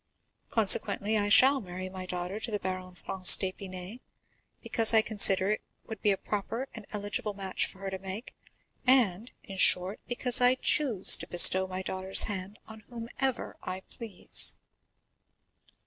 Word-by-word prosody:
Consequently 215 0 +2
I 205 -1 -1
shall 265 +5 +4
marry 185 -1 -8
my 185 0 -10
daughter 180 +3 -6
to 225 - -7
the 210 - -3
Baron 185 -1 -7
Franz 185 0 +6
d'Épinay, 185 +2 -8 0.6
because 225 -1 +2
I 220 - +4
consider 200 -3 +4
it 215 - -3 0.2
would 220 -3 -10
be 210 - +1
a 195 - 0
proper 225 +7 -6
and 220 -4 -12
eligible 210 +1 -5
match 190 -1 -3
for - - -14
her 195 -1 -6
to 190 - -6
make, 195 +5 -9 0.5
and, 235 -4 +1
in 195 - -11
short, 185 +2 +3
because 245 0 +2
I 250 +1 +3
choose 255 -7 +2
to - - -9
bestow 185 +2 +5
my 185 0 -7
daughter's 190 0 +1
hand 200 0 -7
on 220 0 -12
whomever 245 +2 -5
I 185 +1 -7
please." 225 -7 -5
200 Hz, 155 wpm, -27 LUFS, 185-225 Hz, 0.6 s, Franz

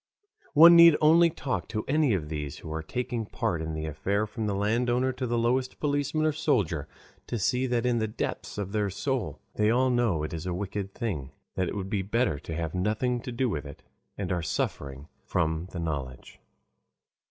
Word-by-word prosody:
One 170 +3 +10
need 170 -2 +9
only 165 +2 +6
talk 140 -5 -3
to 110 -1 -3
any 145 -5 +3
of 80 -5 -3
these 75 -2 -4
who 80 - -7
are 80 - -3
taking 120 +5 -3
part 85 -5 -2
in 80 0 -4
the 80 0 -3
affair 100 +7 -1
from 110 0 -4
the 100 - -1
landowner 120 +5 +1
to 130 0 -4
the 120 0 0
lowest 125 +2 0
policeman 145 +1 0
or 155 - +3
soldier 115 - 0 0.4
to 120 - -2
see 125 +5 +1
that 120 -1 0
in 120 -2 +2
the 110 - 0
depth 105 - -4
of 100 -2 -3
their 105 -1 0
soul 130 +6 -2 0.2
they 105 0 +3
all 130 +3 +3
know 115 -11 +1
it 75 - -4
is 80 +2 -5
a 90 - -1
wicked 100 +1 -4
thing, 90 - -3 0.2
that 95 -1 -1
it - - -5
would 95 -1 -4
be 100 -3 +1
better 100 - 0
to 80 +2 -6
have 80 -1 -3
nothing 110 +6 0
to 125 - -6
do 125 +2 0
with 75 -10 -3
it, 70 - -12 0.3
and 100 -2 -3
are 90 -1 0
suffering 70 -3 -3 0.2
from 80 +2 -1
the 90 - -8
knowledge. 70 -6 -5
105 Hz, 205 wpm, -28 LUFS, 85-125 Hz, 0.4 s, One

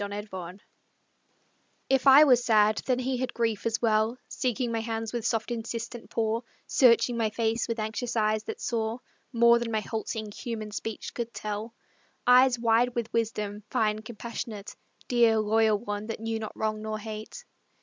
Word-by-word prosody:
THE 200 - -3
BEST 205 +1 -6
FRIEND 185 +1 -8 1.2
If 270 0 +2
I 275 +3 +10
was 250 -5 +5
sad, 215 -2 +3
then 255 -2 +2
he 255 0 -1
had 255 0 -3
grief, 230 -2 0
as 230 0 0
well 220 +1 +2
Seeking 250 -1 -1
my 230 - -1
hands 225 0 -4
with 235 -1 -1
soft 225 +1 -1
insistent 230 0 -5
paw, 225 0 0 0.2
Searching 235 -1 +4
my 225 -2 +1
face 225 +1 -1
with 230 - -2
anxious 225 +3 -3
eyes 215 -1 +1
that - - -6
saw 225 -1 -2 0.3
More 235 -1 +5
than 235 -1 -3
my 220 -1 0
halting, 220 -1 -4
human 215 -1 -5
speech 220 +1 -5
could 235 -1 -4
tell; 215 +2 -5 0.5
Eyes 250 0 +6
wide 235 +1 +2
with 235 -2 -3
wisdom, 210 -2 -2
fine, 215 -1 +1
compassionate 220 -2 -7 0.3
Dear, 235 -2 +4
loyal 215 0 +3
one, 205 -1 -5
that 225 - -5
knew 225 0 -3
not 215 - -7
wrong 215 -1 -1
nor 215 0 -3
hate. 215 - -8
225 Hz, 170 wpm, -28 LUFS, 215-235 Hz, 1.2 s, I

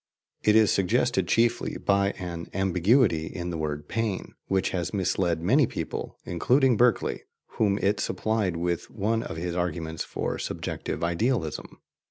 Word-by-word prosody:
* - - -67
It 105 - +4
is 110 -2 +5
suggested 95 -3 +1
chiefly 120 +1 +1
by 100 0 +2
an 85 -2 -5
ambiguity 95 - +3
in 90 0 -5
the 85 - -3
word 75 -1 -3
"pain," 110 -4 -2
which 95 -1 +1
has 90 +2 -2
misled 90 -3 0
many 130 - +4
people, - - -5
including 125 - +3
Berkeley, 120 +1 +2 0.4
whom 100 -2 +3
it 105 +1 +1
supplied 105 -6 -1
with 85 0 -2
one 110 +2 0
of 80 - -6
his 85 +1 -3
arguments 80 -2 -2
for - - -3
subjective - - -4
idealism. 85 - -1
95 Hz, 150 wpm, -27 LUFS, 85-110 Hz, 0.4 s, is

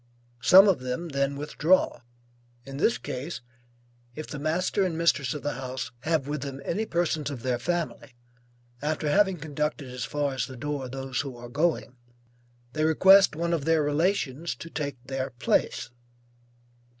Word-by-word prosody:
Some 190 +8 +8
of 190 -7 +3
them 130 +7 -4
then 140 -1 0
withdraw; 150 +5 +1 0.6
in 135 0 -7
this 230 +10 +2
case, 140 +3 -5 0.7
if 155 - -5
the 150 - -7
master 170 +6 0
and 180 -3 -1
the - - -4
mistress 155 -6 +2
of 150 - -6
the 145 - -1
house 130 -2 -5
have 155 0 0
with 145 -1 -3
them 135 -1 -5
any 215 +6 -1
persons 165 -3 0
of 130 -5 -7
their 125 -2 0
family, 165 -6 -3 0.7
after 150 0 -1
having 195 0 +3
conducted 150 -2 -3
as 125 -1 -5
far 145 +1 -1
as 120 -3 -2
the 130 - -10
door 140 0 -4
those 135 -1 -3
who 135 -4 -7
are 120 0 -9
going, 145 -3 0 0.8
they 155 - 0
request 190 +4 +6
one 170 +2 -1
of 155 -4 -1
their 165 -2 +3
relations 155 0 0
to 165 - -10
take 145 -3 -3
their 135 0 -3
place. 120 0 0
145 Hz, 165 wpm, -27 LUFS, 135-165 Hz, 0.8 s, Some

